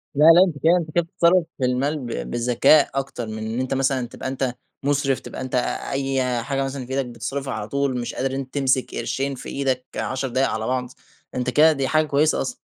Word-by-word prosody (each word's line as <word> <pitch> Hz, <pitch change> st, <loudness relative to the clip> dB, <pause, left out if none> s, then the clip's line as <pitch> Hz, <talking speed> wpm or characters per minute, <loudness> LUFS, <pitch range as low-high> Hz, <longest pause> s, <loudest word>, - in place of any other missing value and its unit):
لا، 150 Hz, -, +5 dB
لأ، 165 Hz, +3 st, +9 dB
أنت 155 Hz, -5 st, -4 dB
كده 170 Hz, +3 st, +5 dB
أنت 160 Hz, -3 st, -4 dB
كده 175 Hz, -, +4 dB
بتتَصرف 170 Hz, +1 st, +3 dB
في 130 Hz, -, 0 dB
المال 135 Hz, +5 st, 0 dB
ب 115 Hz, -, -5 dB
بالذكاء 125 Hz, +5 st, +4 dB
أكتر 135 Hz, -4 st, -3 dB
من 110 Hz, 0 st, -5 dB
إن 110 Hz, +3 st, -3 dB
أنت 130 Hz, 0 st, -1 dB
مثلًا 135 Hz, -2 st, 0 dB
تبقى 130 Hz, -, -7 dB
أنت 130 Hz, -1 st, -2 dB, 0.3 s
مُصرف، 140 Hz, -1 st, +1 dB
تبقى -, -, -8 dB
أنت 130 Hz, -1 st, -4 dB, 0.4 s
أي 130 Hz, -3 st, 0 dB
حاجة 135 Hz, 0 st, -1 dB
مثلًا 135 Hz, -1 st, -4 dB
في 130 Hz, -, -11 dB
إيدك 135 Hz, -, 0 dB
بتصرفها 125 Hz, +3 st, -4 dB
على 110 Hz, -1 st, -4 dB
طول 140 Hz, -1 st, -1 dB
مش 120 Hz, -, -4 dB
قادر 135 Hz, 0 st, -1 dB
إن -, -, -2 dB
أنت 130 Hz, -1 st, -7 dB
تمسك 130 Hz, -2 st, +1 dB
قرشين 135 Hz, 0 st, -2 dB
في -, -, -8 dB
إيدك 130 Hz, -2 st, -1 dB
10 130 Hz, +1 st, -2 dB
دقايق 130 Hz, +2 st, +1 dB
على 110 Hz, +1 st, -3 dB
بعض 125 Hz, -1 st, -1 dB, 0.5 s
أنت 125 Hz, 0 st, -1 dB
كده 155 Hz, +5 st, +6 dB
دي 135 Hz, -3 st, -1 dB
حاجة 155 Hz, +3 st, +2 dB
كويسة 150 Hz, +1 st, +2 dB
أصلًا. -, -, -2 dB
135 Hz, 225 wpm, -23 LUFS, 125-140 Hz, 0.5 s, لأ